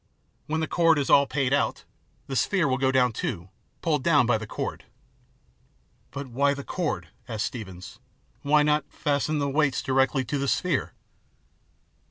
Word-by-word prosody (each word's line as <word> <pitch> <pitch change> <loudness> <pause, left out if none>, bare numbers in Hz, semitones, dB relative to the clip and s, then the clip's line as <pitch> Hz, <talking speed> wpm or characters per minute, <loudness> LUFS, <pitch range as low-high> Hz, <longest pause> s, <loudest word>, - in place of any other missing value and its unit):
When 160 +1 -1
the 160 - -1
cord 165 -2 +3
is 140 - 0
all 140 0 +6
paid 135 -2 0
out, 145 - 0 0.4
the 135 - -5
sphere 170 - +2
will 130 -1 0
go 130 0 +2
down 125 -2 +3
too, 85 -3 -4 0.3
pulled 150 -6 +1
down 150 -7 +4
by 115 -2 +2
the 110 - -7
cord." - - -5 1.2
"But 140 0 -6
why 140 +3 +1
the 140 - -7
cord?" 175 0 -3 0.2
asked 110 -2 -2
Steevens. 95 -7 -9 0.4
"Why 150 +1 +4
not 150 -1 +1
fasten 150 +1 -1
the 140 -1 0
weights 140 -1 +1
directly 135 0 +1
to 140 +4 -2
the 140 - -1
sphere 170 0 0
140 Hz, 165 wpm, -26 LUFS, 130-150 Hz, 1.2 s, all